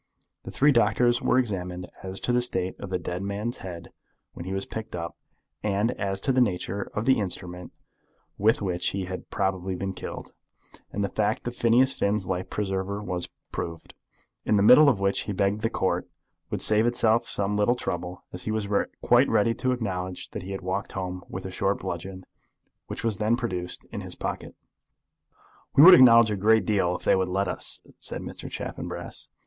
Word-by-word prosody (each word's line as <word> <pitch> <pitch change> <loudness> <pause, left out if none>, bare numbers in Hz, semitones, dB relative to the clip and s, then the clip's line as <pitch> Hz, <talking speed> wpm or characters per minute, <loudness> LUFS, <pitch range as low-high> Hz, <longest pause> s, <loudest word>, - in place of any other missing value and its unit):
The - - -6
three 145 +2 +4
doctors 120 -1 +3
were - - +2
examined 90 -7 -2 0.2
as 95 0 -2
to - - 0
the 125 - +3
state 95 -6 -1
of 100 - -7
the 95 - 0
dead 90 +1 -4
man's 100 +4 -3
head 85 -3 -8 0.4
when 85 - -8
he 95 - -5
was 95 0 -1
picked 110 -2 -6
up, 85 0 -5 0.5
and 105 +3 +1
as 100 -4 -2
to 135 - +1
the 130 0 +3
nature 100 -2 -1
of 105 - -1
the 130 -2 +4
instrument 90 -2 -4 0.6
with 110 +1 +2
which 90 -2 -1
he 95 -1 -1
had 95 0 -7
probably 95 -2 -1
been 95 +1 -3
killed; - - -8 0.6
and 100 - -2
the - - +1
fact 105 +4 -1
of 120 - -4
Phineas 120 +3 +4
Finn's 100 -1 0
life 90 0 -3
preserver 100 0 -2
was 90 -3 -3 0.2
proved, 85 -1 -6 0.5
in 110 - +2
the 100 - +3
middle 140 +7 +8
of 115 -8 +1
which 100 0 +1
he - - -1
begged 100 +2 +1
that - - -12
the 115 - +1
Court 90 -4 -1 0.4
would - - -1
save 110 +2 +4
itself 115 -1 +2
some 100 0 0
little 105 +4 +3
trouble, 90 -5 -5
as 90 - -4
he 110 - -1
was 110 -2 -1 0.4
quite - - +5
ready 115 +3 +3
to 130 +2 -1
acknowledge 95 -7 -4
that - - -5
he 90 - -9
had 95 - -4
walked 95 +2 -3
home 90 -1 -4
with 95 - -6
the 95 - -6
short 100 +2 0
bludgeon, 95 +2 -6 0.6
which - - -6
was 110 -3 -1
then 110 +2 +2
produced, 90 -7 -4
in - - -5
his - - -7
pocket. - - -5 1.2
"We 140 - +8
would 185 +2 +11
acknowledge 115 -7 +8
a - - 0
great 110 +3 +4
deal 95 -5 +1
if - - -7
they - - +4
would 95 -1 0
let 95 +1 0
us," - - -2 0.2
said - - -4
Mr. - - -7
Chaffanbrass. - - -5
100 Hz, 200 wpm, -26 LUFS, 95-110 Hz, 1.2 s, would